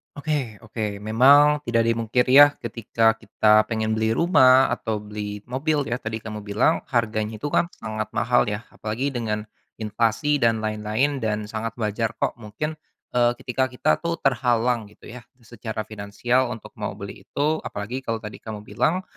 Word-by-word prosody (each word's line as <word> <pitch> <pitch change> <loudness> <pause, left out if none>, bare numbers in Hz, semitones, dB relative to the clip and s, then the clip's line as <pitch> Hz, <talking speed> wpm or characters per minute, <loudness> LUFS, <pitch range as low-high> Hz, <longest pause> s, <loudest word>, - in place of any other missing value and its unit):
Oke 145 -6 -2
oke. 105 -2 -4
Memang 140 +7 +6
tidak 115 -1 +2
dimungkiri, 115 +3 +2
ya, 145 - +11 0.2
ketika 115 -1 +1
kita 110 -1 +3
pengen 110 -1 -1
beli 110 +1 +1
rumah 130 -6 +5
atau 110 -2 -2
beli 105 -1 -6
mobil, 145 +5 -1
ya, 125 - -1
tadi 110 -1 -5
kamu 105 -1 -6
bilang 105 +10 +2
harganya 110 -3 -1
itu, 145 +7 -4
kan, 170 - +2
sangat 110 -1 -4
mahal, 120 0 +2
ya. 105 +1 -3
Apalagi 115 +6 -3
dengan 110 -4 -2 0.3
inflasi 115 +7 0
dan 115 -1 +3
lain-lain, 110 +6 -1
dan 105 -1 -1
sangat 110 +1 -5
wajar, 115 +1 -2
kok, - - 0
mungkin, 115 +9 -4 0.4
eee, 120 -1 +4
ketika 130 0 -1
kita, 125 - +1
tuh, 170 0 -2
terhalang, 120 -3 +1
gitu, 105 - -19
ya, 125 +1 -9 0.2
secara 110 -1 -6
finansial 110 +5 -1
untuk 115 -3 -8
mau 105 -1 -3
beli 100 -1 -8
itu. 145 - -1
Apalagi 115 +6 -5
kalau 115 -3 -2
tadi 105 0 -8
kamu 105 -2 -7
bilang 180 - 0
115 Hz, 165 wpm, -24 LUFS, 110-130 Hz, 0.4 s, ya